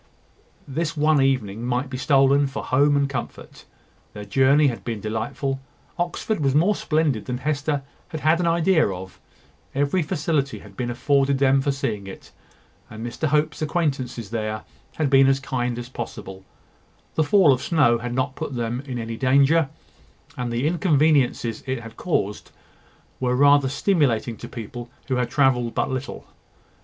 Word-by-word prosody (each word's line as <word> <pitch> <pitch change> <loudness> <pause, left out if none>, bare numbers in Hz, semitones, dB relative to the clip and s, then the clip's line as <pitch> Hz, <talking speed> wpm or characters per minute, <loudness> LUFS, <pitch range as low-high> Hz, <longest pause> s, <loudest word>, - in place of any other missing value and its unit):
This 155 +3 -3
one 150 -1 +3
evening 120 -6 0
might 125 +2 -1
be 130 - -7
stolen 140 +1 +3
for 135 - -5
home 145 +2 +3
and 140 0 +2
comfort. 130 -3 -7 0.5
Their 105 0 -8
journey 135 +7 +4
had 125 -5 -1
been 115 -3 -4
delightful. 110 +6 -3 0.4
Oxford 175 +4 -2
was 140 -2 +1
more 175 +8 +4
splendid 150 -8 0
than 125 -1 -3
Hester 145 +1 -1 0.2
had 155 - -6
had 160 +2 +3
an 175 - +1
idea 170 0 +3
of. 95 -1 -8 0.6
Every 145 +6 +1
facility 150 -4 -1
had 100 -2 -14
been 120 +2 -3
afforded 135 +3 +1
them 135 0 +3
for 140 +1 0
seeing 105 -7 -3
it, 95 - -11 0.6
and 110 +1 -7
Mr 120 +6 -2
Hope's 150 +1 0
acquaintances 135 - -2
there 110 -2 -3 0.3
had 150 -3 0
been 135 0 +6
as 135 0 +3
kind 125 -2 -2
as 120 0 -6
possible. 95 -6 -7 0.7
The 160 - +2
fall 155 -2 +5
of 130 - -3
snow 145 -8 +3
had 120 +1 -4
not 130 0 -1
put 145 -2 -5
them 120 +1 -2
in 125 -2 -4
any 115 -1 -5
danger, 140 +4 +3 0.7
and 125 -1 -3
the 120 +4 -1
inconveniences 150 - +2
it 130 -2 -2
had 115 -1 -11
caused 105 - -2 0.7
were 125 -1 0
rather 140 0 +5
stimulating 140 - +1
to - - -8
people 120 +1 -8 0.2
who 130 - +1
had 125 -1 0
travelled 125 -3 +2
but - - 0
little. 130 +1 -5
135 Hz, 165 wpm, -23 LUFS, 120-150 Hz, 0.7 s, been